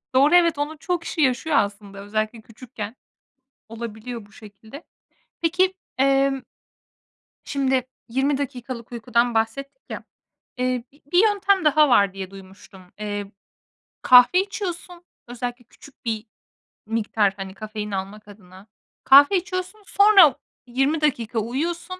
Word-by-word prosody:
Doğru, 285 +6 +5
evet, 335 -3 +4
onu 295 +2 -3
çoğu 355 +3 -2
kişi 335 -1 -4
yaşıyor 270 +3 +1
aslında. 200 -2 -1
Özellikle 215 +2 -3
küçükken 225 -1 -9 0.7
olabiliyor 230 0 -7
bu 205 - -24
şekilde. 220 - -13 0.6
Peki, 365 +3 +2 0.2
emm, 270 0 +2 1.0
şimdi, 265 -2 0 0.2
20 270 +4 0
dakikalık 250 -3 -6
uykudan 235 0 0
bahsettik 245 - -2
ya, - - -6 0.5
eee, 250 -1 -1
bi 290 - -26
bir 390 +5 +5
yöntem 395 -2 +1
daha 300 0 +5
var 200 -6 +4
diye 190 -1 -7
duymuştum. 195 0 -14 0.2
Eee, 205 -1 -5 0.7
kahve 250 +9 +7
içiyorsun. 360 -4 -6 0.2
Özellikle 245 0 -6
küçük 270 +4 -19
bir 220 -2 -2 0.6
miktar, 215 -2 0
hani, 195 -1 -7
kafein 210 +1 -6
almak 200 +2 -6
adına 190 -1 -16 0.4
kahve 285 +8 +7
içiyorsun. 370 +2 -5
Sonra 400 -7 +6 0.3
20 270 +6 0
dakika 240 -6 0
uyuyorsun 335 - -4
250 Hz, 125 wpm, -23 LUFS, 215-305 Hz, 1.0 s, kahve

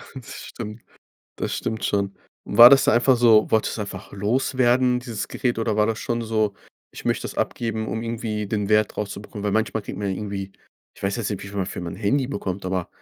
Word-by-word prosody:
Das 130 -4 -9
stimmt. 110 -1 -7 0.6
Das - - -2
stimmt 110 -3 -3
schon. 100 -1 0 0.3
Und - - -5
war 120 +1 +12
das 135 -1 +6
da - - +4
einfach 120 +3 +4
so, 115 -3 +5
wolltest 110 -1 +1
du - - -5
das 100 - -6
einfach 95 0 -10
loswerden, 125 +3 +2
dieses 120 -4 -5
Gerät, 120 -4 -1
oder 110 -2 0
war 105 0 +4
das 110 0 -1
schon 120 0 -2
so: 110 -2 0 0.4
„Ich - - -10
möchte - - 0
es - - -7
abgeben, 110 -2 -2
um 115 - -3
irgendwie 115 -2 -3
den 105 -1 -2
Wert 105 0 +2
rauszubekommen?“ 105 0 -5
Weil 105 - 0
manchmal 110 0 0
kriegt 95 - -7
man 100 -1 -2
ja - - -1
irgendwie 100 -2 -5 0.4
ich - - -16
weiß 95 0 0
jetzt 115 -4 -2
nicht, 100 - -4
wie 100 - -8
viel 100 - -9
man 95 - 0
für - - -5
mein 85 +1 -5
Handy 120 +7 +1
bekommt, 95 -8 -4
aber 95 -1 -2
110 Hz, 230 wpm, -23 LUFS, 100-120 Hz, 0.6 s, war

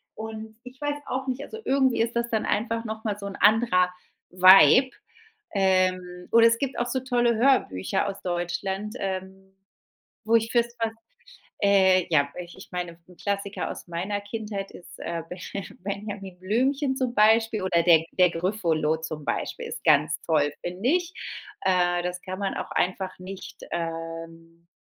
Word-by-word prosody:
Und 220 0 -7
ich 255 +1 -13
weiß 290 0 -1
auch 265 +1 -2
nicht, 260 +2 -2
also, 445 +9 -8
irgendwie 265 -3 +2
ist 235 +1 -1
das 235 0 0
dann 220 -2 0
einfach 230 +2 -1
noch 220 0 -5
mal 205 -1 -1
so 200 - -8
'n 200 - -7
anderer 205 -4 +4 0.4
Vibe. 190 +8 +7 0.6
Ähm, 185 -2 +1
oder 230 0 +7
es 230 0 +3
gibt 275 -2 -3
auch - - 0
so 260 - -1
tolle 240 -2 +2
Hörbücher 225 - +2
aus 195 0 -5
Deutschland, 190 +5 -3
ähm, 190 0 -5 0.7
wo 225 +1 +1
ich 225 0 0
für's 235 0 +1
fast 225 0 -1 0.7
Äh, 190 -2 +5
ja, 145 -3 +3
ich 175 0 -8
ich 190 - -12
meine, 175 -2 -4
'n 180 - -17
Klassiker 200 +1 -3
aus - - -8
meiner 190 +4 -3
Kindheit 205 -1 -5
ist, 175 0 -13
äh, 170 -1 -3
Benja 185 +2 -6 0.2
Benjamin 200 -1 -6
Blümchen 260 +8 +1
zum 255 -2 -1
Beispiel 220 -1 +4
oder 170 -3 +2
der 165 -2 +5
der 180 -2 +6
Grüffolo 165 -4 0
zum 155 -2 -6
Beispiel - - -3
ist - - -7
ganz - - +3
toll, 150 -2 +1
finde 180 +7 -3
ich. 350 +2 +1 0.5
Äh, 175 -2 +2
das 180 0 -4
kann 185 0 -6
man 195 -1 -1
auch - - -4
einfach 185 +1 -1
nicht, 185 +1 -9
ähm, 165 0 -6
195 Hz, 165 wpm, -26 LUFS, 180-225 Hz, 0.7 s, Vibe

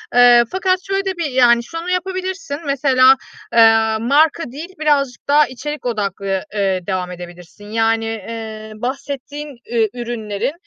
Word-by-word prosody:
Iıı, 240 -1 +7
fakat 375 0 +1
şöyle 390 0 -1
de 380 -2 -2
bir, 340 - -1
yani, 240 -2 +4
şunu 330 +6 -6
yapabilirsin. 370 -3 -3
Mesela, 265 -1 +5 0.4
ııı, 225 -1 +5
marka 295 +7 +3
değil, 310 +6 -7
birazcık 280 -5 0
daha 295 +1 +5
içerik 295 +3 -6
odaklı, 200 -4 -2 0.3
ııı, 190 -3 -1
devam 185 -2 -2
edebilirsin. 175 +3 -11
Yani, 225 -1 -1
ııı, 220 -1 -7
bahsettiğin, 280 +3 -5 0.3
ııı, 225 -2 +3
ürünlerin, 235 0 -3
245 Hz, 135 wpm, -18 LUFS, 220-295 Hz, 0.4 s, Iıı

